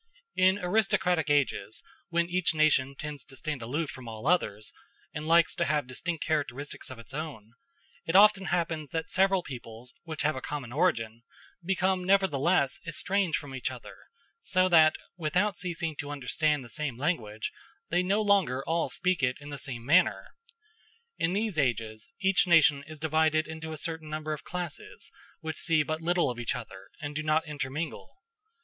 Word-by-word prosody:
In 185 Hz, +1 st, +4 dB
aristocratic 180 Hz, -4 st, +1 dB
ages, 145 Hz, -6 st, 0 dB, 0.3 s
when 170 Hz, 0 st, +1 dB
each 180 Hz, -2 st, +1 dB
nation 145 Hz, -3 st, +3 dB
tends 145 Hz, -2 st, -6 dB
to 135 Hz, -, -14 dB
stand 150 Hz, 0 st, -4 dB
aloof 145 Hz, +7 st, -2 dB
from 130 Hz, -2 st, -10 dB
all 110 Hz, +1 st, -7 dB
others 110 Hz, -, +1 dB, 0.4 s
and 150 Hz, +1 st, -5 dB
likes 170 Hz, 0 st, +5 dB
to -, -, 0 dB
have 150 Hz, -1 st, +1 dB
distinct 155 Hz, +6 st, -4 dB
characteristics 145 Hz, -3 st, -3 dB
of 130 Hz, -, -8 dB
its 115 Hz, +2 st, -12 dB
own, 135 Hz, -8 st, -6 dB, 0.5 s
it 165 Hz, -, -1 dB
often 200 Hz, -1 st, +7 dB
happens 165 Hz, -4 st, -1 dB
that 160 Hz, +2 st, -3 dB
several 190 Hz, -1 st, +3 dB
peoples 120 Hz, -2 st, -9 dB
which 160 Hz, -2 st, -5 dB
have 155 Hz, -1 st, +2 dB
a 130 Hz, -, -5 dB
common 140 Hz, -5 st, -5 dB
origin 115 Hz, -8 st, +1 dB, 0.4 s
become 185 Hz, 0 st, +1 dB
nevertheless 180 Hz, -6 st, +2 dB
estranged 190 Hz, 0 st, 0 dB
from 145 Hz, -2 st, -8 dB
each 130 Hz, -, -2 dB
other, -, -, -10 dB, 0.4 s
so 185 Hz, -, +2 dB
that, 160 Hz, -3 st, +6 dB, 0.2 s
without 180 Hz, +5 st, +1 dB
ceasing 170 Hz, -3 st, -3 dB
to 145 Hz, -, -5 dB
understand 145 Hz, +1 st, 0 dB
the -, -, -11 dB
same 135 Hz, 0 st, -3 dB
language, 120 Hz, -8 st, -2 dB, 0.4 s
they 175 Hz, -, +3 dB
no 200 Hz, +4 st, +1 dB
longer 185 Hz, -11 st, +2 dB
all 165 Hz, 0 st, 0 dB
speak 180 Hz, -4 st, 0 dB
it 125 Hz, -1 st, +1 dB
in 145 Hz, 0 st, -10 dB
the 140 Hz, -, -5 dB
same 120 Hz, -4 st, -5 dB
manner. 170 Hz, +7 st, +3 dB, 0.9 s
In 175 Hz, -, +1 dB
these 205 Hz, -4 st, 0 dB
ages 115 Hz, -5 st, -1 dB
each 195 Hz, -1 st, +3 dB
nation 150 Hz, -5 st, +5 dB
is 155 Hz, 0 st, -9 dB
divided 155 Hz, 0 st, +2 dB
into 160 Hz, 0 st, -6 dB
a 155 Hz, -, -5 dB
certain 160 Hz, 0 st, -4 dB
number 155 Hz, 0 st, -3 dB
of 150 Hz, -, -7 dB
classes, 175 Hz, -4 st, -6 dB, 0.3 s
which 160 Hz, -1 st, -4 dB
see 160 Hz, -3 st, +2 dB
but 155 Hz, +2 st, -3 dB
little 175 Hz, -4 st, +2 dB
of 120 Hz, -, -7 dB
each 120 Hz, -, -1 dB
other, 110 Hz, -6 st, -9 dB
and 145 Hz, -2 st, -5 dB
do 155 Hz, -, -1 dB
not 155 Hz, +1 st, +1 dB
intermingle. 150 Hz, +1 st, -4 dB
155 Hz, 170 wpm, -29 LUFS, 135-175 Hz, 0.9 s, often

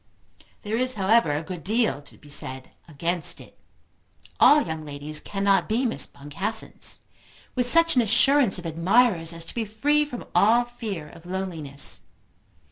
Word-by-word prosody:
There 215 Hz, +2 st, -2 dB
is 255 Hz, +1 st, 0 dB
however 210 Hz, -1 st, +3 dB
a 145 Hz, +2 st, -2 dB
good 175 Hz, -1 st, -8 dB
deal 220 Hz, -6 st, 0 dB
to 145 Hz, -, -15 dB
be -, -, -18 dB
said 130 Hz, -2 st, -3 dB, 0.2 s
against 170 Hz, +2 st, -1 dB
it. -, -, -15 dB, 0.8 s
All 295 Hz, 0 st, +6 dB
young 160 Hz, -1 st, -5 dB
ladies 150 Hz, +1 st, -4 dB
cannot 195 Hz, -1 st, 0 dB
be 235 Hz, +4 st, +1 dB
Miss 235 Hz, -, +1 dB
Boncassens, 145 Hz, +10 st, -4 dB, 0.5 s
with 250 Hz, -1 st, 0 dB
such 330 Hz, +3 st, +6 dB
an 250 Hz, -, +5 dB
assurance 240 Hz, +1 st, +3 dB
of 180 Hz, -, -9 dB
admirers 170 Hz, +1 st, +2 dB
as 165 Hz, 0 st, -2 dB
to -, -, -10 dB
be 235 Hz, -, -2 dB
free 285 Hz, +8 st, +1 dB
from 255 Hz, -5 st, -7 dB
all 235 Hz, +4 st, +4 dB
fear 215 Hz, -10 st, -6 dB
of 165 Hz, +1 st, -15 dB
loneliness. 170 Hz, -7 st, -3 dB
195 Hz, 155 wpm, -24 LUFS, 160-240 Hz, 0.8 s, All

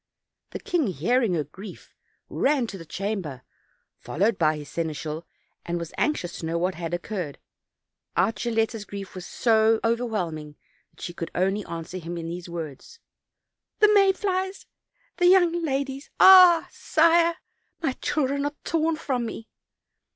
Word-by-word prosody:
The -, -, -6 dB
king, 335 Hz, -7 st, 0 dB
hearing 195 Hz, -, +1 dB
her 155 Hz, -, 0 dB
grief, 185 Hz, +7 st, -12 dB, 0.3 s
ran 280 Hz, -3 st, +1 dB
to 205 Hz, -4 st, -7 dB
the 165 Hz, -, -11 dB
cham 200 Hz, +3 st, -2 dB
ber, 135 Hz, -6 st, -8 dB, 0.6 s
followed 200 Hz, +5 st, 0 dB
by 155 Hz, -2 st, +3 dB
his 150 Hz, -1 st, -9 dB
seneschal, 155 Hz, +1 st, -4 dB, 0.4 s
and 175 Hz, 0 st, -3 dB
was 170 Hz, -1 st, -6 dB
anxious 185 Hz, -, -1 dB
to -, -, -5 dB
know 165 Hz, +1 st, -1 dB
what 180 Hz, +2 st, 0 dB
had 165 Hz, -1 st, -5 dB
occurred; 175 Hz, -5 st, -5 dB, 0.8 s
out 225 Hz, -, +3 dB
Gilletta's 225 Hz, -2 st, -1 dB
grief 200 Hz, -1 st, -8 dB
was 185 Hz, -2 st, -8 dB
so 220 Hz, -1 st, +3 dB
over 230 Hz, +1 st, +1 dB
whelming 165 Hz, -10 st, -4 dB, 0.3 s
that -, -, -21 dB
she 175 Hz, -, -5 dB
could 165 Hz, -1 st, -5 dB
only 195 Hz, +3 st, +1 dB
answer 170 Hz, +2 st, -6 dB
him 170 Hz, +1 st, -6 dB
in 165 Hz, -1 st, -5 dB
these 175 Hz, +1 st, -6 dB
words: 165 Hz, -, -7 dB, 0.8 s
"The 425 Hz, 0 st, +5 dB
may 395 Hz, -2 st, +6 dB
flies! 380 Hz, 0 st, -2 dB, 0.5 s
the 355 Hz, -, +4 dB
young 350 Hz, -2 st, +4 dB
ladies! 275 Hz, -1 st, -2 dB
ah! 365 Hz, -3 st, +8 dB
Sire, 335 Hz, +1 st, +3 dB, 0.4 s
my 320 Hz, -5 st, 0 dB
children 280 Hz, -1 st, 0 dB
are 290 Hz, 0 st, -3 dB
torn 325 Hz, 0 st, +1 dB
from 255 Hz, -6 st, -2 dB
me!' 225 Hz, 0 st, -8 dB
215 Hz, 155 wpm, -25 LUFS, -, 0.8 s, ah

